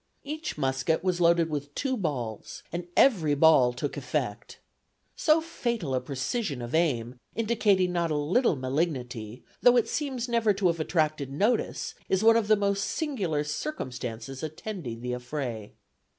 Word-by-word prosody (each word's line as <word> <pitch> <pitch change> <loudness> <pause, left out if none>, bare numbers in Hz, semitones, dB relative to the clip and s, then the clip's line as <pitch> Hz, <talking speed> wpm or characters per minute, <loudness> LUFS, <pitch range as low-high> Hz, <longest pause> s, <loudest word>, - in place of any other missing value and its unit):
Each 310 - -5
musket 135 +3 0
was 180 -2 0
loaded 170 -1 +4
with 145 -1 -4
two 270 -2 0
balls 130 - -4
and 175 0 -4
every 165 - +4
ball 145 -5 +6
took 130 +4 -4
effect. 125 -5 -3 0.6
"So 315 -1 +3
fatal 235 - -3
a 130 - +1
precision 140 - -2
of 120 - -7
aim, 125 -7 0 0.2
indicating 210 -5 +2
not 170 -1 0
a 155 - 0
little 165 - +2
malignity, 130 -5 -3 0.2
though 245 0 +6
it 235 - +3
seems 265 -5 -2
never 230 -3 +2
to 195 0 -2
have 170 -2 +2
attracted 155 -4 0
notice, 215 - 0 0.2
is 190 +2 +2
one 225 0 +7
of 230 -3 +2
the 215 - +6
most 200 -1 0
singular 200 - -1
circumstances 130 - -5
attending 155 - -6
the 125 0 -3
affray. 125 -4 -5
160 Hz, 150 wpm, -28 LUFS, 130-215 Hz, 0.6 s, one